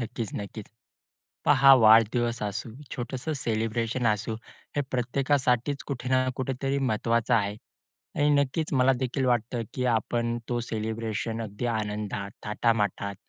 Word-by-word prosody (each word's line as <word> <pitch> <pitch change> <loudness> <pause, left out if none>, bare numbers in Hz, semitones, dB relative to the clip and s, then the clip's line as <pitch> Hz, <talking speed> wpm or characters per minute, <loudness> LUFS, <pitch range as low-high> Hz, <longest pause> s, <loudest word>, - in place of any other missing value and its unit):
नक्कीचं, 115 -2 -4
नक्कीचं. 100 +1 -8 0.8
पहा 135 -1 +8
वाढदिवस 115 0 +4
असू, 105 +2 -3 0.2
छोटंसं 130 +5 -4
सेलिब्रेशन 115 0 -1
असू. 110 +1 0 0.4
हे - - +3
प्रत्येकासाठीचं 130 +1 0
कुठे 125 -2 -4
ना 130 0 +3
कुठेतरी 135 +1 -1
महत्त्वाचा 115 -1 +1
आहे 105 -2 0 0.6
आणि 145 0 +3
नक्कीचं 140 +1 -1
मला 130 +1 +5
देखील 130 +1 -1
वाटतं 120 0 0
की 125 - -2
आपण 120 +1 -1
तो 120 -1 0
सेलिब्रेशन 110 0 -3
अगदी 105 +3 -4
आनंदात, 105 -1 -3
थाटामाटात 105 -2 0
120 Hz, 120 wpm, -27 LUFS, 110-130 Hz, 0.8 s, पहा